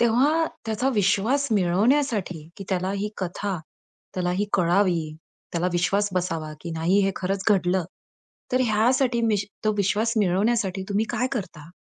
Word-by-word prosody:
तेव्हा 275 Hz, +8 st, +3 dB, 0.2 s
त्याचा 225 Hz, +4 st, 0 dB
विश्वास 215 Hz, +8 st, +2 dB
मिळवण्यासाठी, 200 Hz, -, +1 dB
की 195 Hz, -, -7 dB
त्याला 185 Hz, 0 st, -1 dB
ही 200 Hz, +1 st, -2 dB
कथा 190 Hz, 0 st, -3 dB, 0.6 s
त्याला 180 Hz, -1 st, -1 dB
ही 205 Hz, +3 st, 0 dB
कळावी, 175 Hz, -3 st, +2 dB, 0.4 s
त्याला 175 Hz, +1 st, 0 dB
विश्वास 195 Hz, +4 st, +1 dB
बसावा, 165 Hz, -4 st, -2 dB
की 170 Hz, -, -6 dB
नाही 165 Hz, +5 st, +2 dB
हे 195 Hz, -, +1 dB
खरंच 195 Hz, +1 st, -2 dB
घडलं. 185 Hz, -2 st, +2 dB, 0.7 s
तर 255 Hz, -, +3 dB
ह्यासाठी 240 Hz, +3 st, +2 dB
मिश 210 Hz, -3 st, +1 dB, 0.2 s
तो 215 Hz, -, +3 dB
विश्वास 205 Hz, +4 st, +1 dB
मिळवण्यासाठी 195 Hz, 0 st, +1 dB
तुम्ही 205 Hz, +2 st, +1 dB
काय 240 Hz, +2 st, 0 dB
करता? 170 Hz, -8 st, -5 dB
200 Hz, 140 wpm, -24 LUFS, 180-225 Hz, 0.7 s, तेव्हा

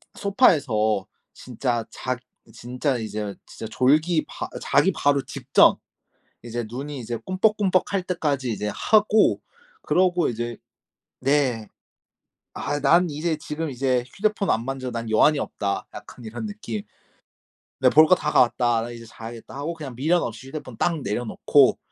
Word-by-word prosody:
소파에서 125 Hz, -, +2 dB, 0.3 s
진짜 120 Hz, -1 st, -3 dB
자 130 Hz, 0 st, -3 dB, 0.6 s
진짜 135 Hz, 0 st, +1 dB
이제 105 Hz, -2 st, -4 dB
진짜 110 Hz, -, -8 dB
졸기 155 Hz, +7 st, +2 dB
바 -, -, -6 dB
어 -, -, -8 dB
자기 -, -, +3 dB
바로 140 Hz, -1 st, +1 dB
직전 -, -, +4 dB, 0.7 s
이제 120 Hz, 0 st, -4 dB
눈이 140 Hz, +4 st, -6 dB
이제 120 Hz, 0 st, -4 dB
끔뻑끔뻑할 195 Hz, -1 st, +1 dB
때까지 145 Hz, -8 st, -1 dB
이제 105 Hz, -1 st, -3 dB
하고 215 Hz, -, +3 dB, 0.4 s
그러고 180 Hz, -2 st, +2 dB
이제 120 Hz, -1 st, -4 dB, 0.6 s
네. 130 Hz, -6 st, +1 dB, 0.9 s
'아 145 Hz, -, -3 dB
난 170 Hz, +6 st, +4 dB
이제 155 Hz, +2 st, -2 dB
지금 155 Hz, +1 st, -4 dB
이제 130 Hz, -1 st, 0 dB
휴대폰 210 Hz, -1 st, 0 dB
안 115 Hz, +1 st, +1 dB
만져. 135 Hz, -1 st, -4 dB
난 115 Hz, -1 st, -4 dB
여한이 145 Hz, +7 st, +4 dB
없다.' 100 Hz, -6 st, -3 dB
약간 105 Hz, +3 st, -11 dB
이런 115 Hz, -, -6 dB
느낌. 210 Hz, 0 st, -5 dB, 1.0 s
네 -, -, +5 dB
'볼 155 Hz, +1 st, +7 dB
거 185 Hz, -, +6 dB
다 150 Hz, -4 st, -2 dB
가았다. 120 Hz, -1 st, +3 dB
나 120 Hz, -, -5 dB
이제 115 Hz, -1 st, -10 dB
자야겠다.' 115 Hz, 0 st, -10 dB
하고 145 Hz, +5 st, -3 dB
그냥 145 Hz, -6 st, -8 dB
미련 160 Hz, +8 st, +2 dB
없이 120 Hz, +3 st, -6 dB
휴대폰 135 Hz, -4 st, -8 dB
딱 170 Hz, -2 st, 0 dB
내려놓고 120 Hz, 0 st, +2 dB
135 Hz, 280 characters per minute, -24 LUFS, 120-165 Hz, 1.0 s, 볼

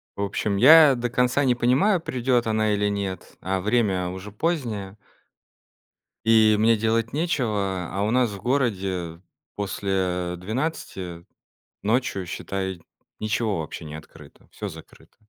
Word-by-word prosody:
В -, -, -5 dB
общем, 100 Hz, 0 st, -1 dB
я 150 Hz, +4 st, +8 dB
до 120 Hz, 0 st, -2 dB
конца 125 Hz, +3 st, +2 dB
не 125 Hz, -2 st, +3 dB
понимаю, 135 Hz, -, +3 dB
придёт 125 Hz, -4 st, 0 dB
она 110 Hz, -1 st, +1 dB
или 105 Hz, 0 st, +1 dB
нет, 100 Hz, -2 st, -4 dB
а 95 Hz, 0 st, -1 dB
время 100 Hz, -4 st, +1 dB
уже 95 Hz, +3 st, -8 dB
позднее. 110 Hz, -, -2 dB, 1.3 s
И 110 Hz, -1 st, +5 dB
мне 115 Hz, +2 st, +4 dB
делать 115 Hz, +1 st, 0 dB
нечего. 105 Hz, -, -1 dB
А 100 Hz, +2 st, -3 dB
у 105 Hz, -, +1 dB
нас 125 Hz, -1 st, +2 dB
в 100 Hz, -, -7 dB
городе 95 Hz, -10 st, -1 dB, 0.3 s
после 95 Hz, -3 st, -2 dB
12 95 Hz, -, -4 dB, 0.6 s
ночью, 110 Hz, -4 st, 0 dB
считай, 95 Hz, 0 st, -4 dB, 0.4 s
ничего 110 Hz, -3 st, 0 dB
вообще 80 Hz, +1 st, -6 dB
не 75 Hz, 0 st, -7 dB
открыто. 75 Hz, -1 st, -14 dB
Всё -, -, -6 dB
закрыто. -, -, -13 dB
105 Hz, 135 wpm, -24 LUFS, 95-120 Hz, 1.3 s, я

